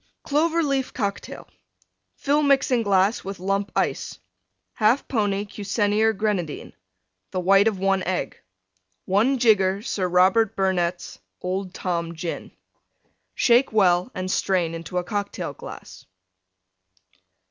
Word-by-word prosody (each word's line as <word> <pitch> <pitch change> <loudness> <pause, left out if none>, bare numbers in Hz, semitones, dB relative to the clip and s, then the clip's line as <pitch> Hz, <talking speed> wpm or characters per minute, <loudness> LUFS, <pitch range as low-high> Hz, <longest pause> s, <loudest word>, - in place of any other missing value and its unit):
CLOVER 325 +3 +1
LEAF 275 -3 -1
COCKTAIL 200 -4 -4 0.7
Fill 290 +2 +1
Mixing 270 -4 +3
glass 200 0 +2
with 195 0 -6
Lump 195 +2 -2
Ice. - - -1 0.6
1/2 225 +5 +3
pony 205 -4 0
Cusenier 205 +2 0
Grenadine. 200 -7 -3 0.6
The 185 - -3
white 195 +3 +4
of 215 -3 0
one 195 0 +1
Egg. 185 0 -3 0.6
1 225 +8 +2
jigger 205 -4 +3
Sir 190 -5 -1
Robert 190 +5 +3
Burnette's 180 -2 -1 0.2
Old 185 0 -4
Tom 170 -2 -3
Gin. 165 +1 -5 0.8
Shake 245 +2 +3
well 185 0 +3
and 185 0 -3
strain 180 -5 0
into 165 +2 -6
a 180 - 0
Cocktail 200 +2 -4
glass. - - -11
195 Hz, 115 wpm, -23 LUFS, 185-225 Hz, 0.8 s, white